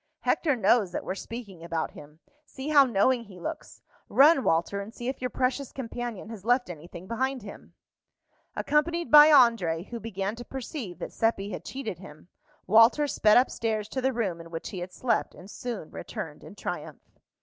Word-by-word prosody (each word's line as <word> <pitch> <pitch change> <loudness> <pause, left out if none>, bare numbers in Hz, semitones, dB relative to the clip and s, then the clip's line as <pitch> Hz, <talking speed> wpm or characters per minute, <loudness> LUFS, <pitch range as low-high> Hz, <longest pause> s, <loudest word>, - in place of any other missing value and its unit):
"Hector 295 -5 +1
knows 210 -3 +3
that - - -3
we're - - -2
speaking 200 -4 -8
about 165 -2 -2
him. 150 +2 -14 0.2
See 275 -1 -7
how 285 -2 +7
knowing 235 +1 +2
he 190 -3 -13
looks! - - -7 0.3
Run, 280 0 +6
Walter, 170 +5 +1
and 200 +2 -8
see 240 +1 -7
if 265 - -5
your 250 - -1
precious 255 +1 -1
companion 240 -4 -6
has 220 -4 -9
left 245 -3 +2
anything 170 +2 -10
behind 260 +3 -2
him." 200 - -12 0.8
Accompanied 335 +3 0
by 295 0 +10
André, 230 - +4
who 235 - -5
began 205 -2 -4
to 240 - -7
perceive 245 - -6
that 175 - -7
Seppi 215 -3 0
had 180 - -6
cheated 225 - -6
him, 175 -3 -13 0.4
Walter 225 +8 +5
sped 215 -6 +4
up 250 - +4
stairs 215 -2 -2
to 260 - -3
the 265 +1 +2
room 200 -9 -2
in 165 - -12
which 165 -1 -6
he 185 - -6
had 180 +1 -6
slept, 245 +5 -1
and 190 +3 -12
soon 235 -10 -6
returned - - -7
in - - -12
triumph. - - -7
225 Hz, 185 wpm, -27 LUFS, 185-260 Hz, 0.8 s, by